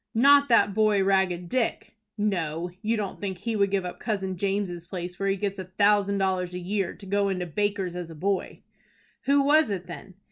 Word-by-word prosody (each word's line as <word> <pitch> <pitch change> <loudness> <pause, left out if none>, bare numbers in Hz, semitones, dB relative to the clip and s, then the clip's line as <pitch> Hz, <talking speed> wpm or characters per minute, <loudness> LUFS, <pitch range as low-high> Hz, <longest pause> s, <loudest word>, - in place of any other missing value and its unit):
"Not 280 +4 +6
that 230 -4 +4
boy, 215 -2 +3
Ragged 190 -2 +1
Dick?" 235 +3 -2 0.2
"No, 175 -5 -1
you 225 +2 0
don't 205 -3 -4
think 190 -3 -3
he 230 +4 -3
would 200 -1 +2
give 190 -1 0
up 180 - -6
Cousin 195 -4 -2
James' 190 -2 -2
place, 180 0 -6
where 195 0 0
he 195 - +2
gets 195 0 -3
a 185 - -5
thousand 200 +1 +2
dollars 185 -2 -1
a - - -3
year, 190 +1 -2
to 200 - -13
go 200 +1 +1
into 180 -2 -2
Baker's 195 +1 -2
as 175 -2 -6
boy?" 185 +5 -3 0.6
"Who 280 +1 +4
was 300 -1 +4
it, 185 -3 -3
then?" 190 0 -10
195 Hz, 200 wpm, -26 LUFS, 180-210 Hz, 0.6 s, Not